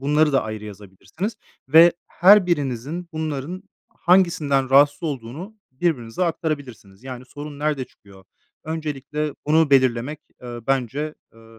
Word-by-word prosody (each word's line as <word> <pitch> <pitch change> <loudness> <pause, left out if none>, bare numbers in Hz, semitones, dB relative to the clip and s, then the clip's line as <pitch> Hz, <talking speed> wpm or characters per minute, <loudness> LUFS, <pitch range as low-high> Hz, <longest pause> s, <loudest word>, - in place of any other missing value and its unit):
Bunları 150 +2 +2
da 135 - +3
ayrı 110 -1 -6
yazabilirsiniz 105 - -7 0.3
ve 165 +4 +8
her 190 +1 +6
birinizin 145 +2 -2
bunların 155 +3 -4 0.3
hangisinden 155 -7 +2
rahatsız 145 +4 +5
olduğunu 150 - -5 0.2
birbirinize 130 0 -1
aktarabilirsiniz. 145 - -4
Yani, 130 -1 -7
sorun 145 +2 -9
nerede 145 -3 -1
çıkıyor? 95 -4 -19 0.4
Öncelikle 150 -1 -4
bunu 155 0 +3
belirlemek, 130 +2 +2 0.2
eee, 120 -1 -7
bence, 135 +3 -1 0.2
eee 115 0 -18
145 Hz, 120 wpm, -22 LUFS, 125-160 Hz, 0.4 s, ve